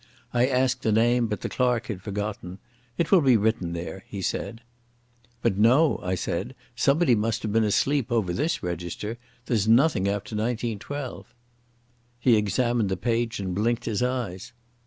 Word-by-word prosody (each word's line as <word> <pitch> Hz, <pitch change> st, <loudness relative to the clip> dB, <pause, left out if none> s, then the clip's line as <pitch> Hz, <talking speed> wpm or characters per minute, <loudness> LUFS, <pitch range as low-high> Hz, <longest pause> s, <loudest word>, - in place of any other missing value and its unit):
I 120 Hz, +1 st, +3 dB
asked 130 Hz, -1 st, +1 dB
the 110 Hz, -, +1 dB
name, 120 Hz, +2 st, +3 dB
but 105 Hz, -1 st, -4 dB
the -, -, -2 dB
clerk 125 Hz, -2 st, 0 dB
had 100 Hz, -5 st, -5 dB
forgotten. 100 Hz, -2 st, -5 dB, 0.4 s
"It 165 Hz, -2 st, 0 dB
will 190 Hz, -4 st, +7 dB
be 130 Hz, -5 st, +5 dB
written 105 Hz, -5 st, 0 dB
there," 85 Hz, +3 st, -6 dB
he 100 Hz, -, -7 dB
said. 115 Hz, +5 st, -3 dB, 0.8 s
"But, 100 Hz, -, +1 dB
no," 130 Hz, +8 st, +4 dB
I 90 Hz, +1 st, -1 dB
said. -, -, -3 dB, 0.2 s
"Somebody 140 Hz, -1 st, +3 dB
must 115 Hz, +2 st, 0 dB
have 105 Hz, -, -2 dB
been 115 Hz, 0 st, +3 dB
asleep 130 Hz, +4 st, +1 dB
over 105 Hz, -7 st, +1 dB
this 150 Hz, -, -1 dB
register. 90 Hz, +6 st, -4 dB, 0.3 s
There's 110 Hz, -4 st, 0 dB
nothing 115 Hz, -3 st, +4 dB
after 100 Hz, +2 st, -3 dB
1912." 120 Hz, +4 st, -4 dB, 0.8 s
He 120 Hz, -1 st, +4 dB
examined 110 Hz, +1 st, +1 dB
the 95 Hz, -, -1 dB
page 120 Hz, +2 st, -1 dB
and 95 Hz, -2 st, -3 dB
blinked 115 Hz, +5 st, 0 dB
his 110 Hz, -2 st, -1 dB
eyes. 120 Hz, -5 st, -3 dB
115 Hz, 160 wpm, -25 LUFS, 100-125 Hz, 0.8 s, will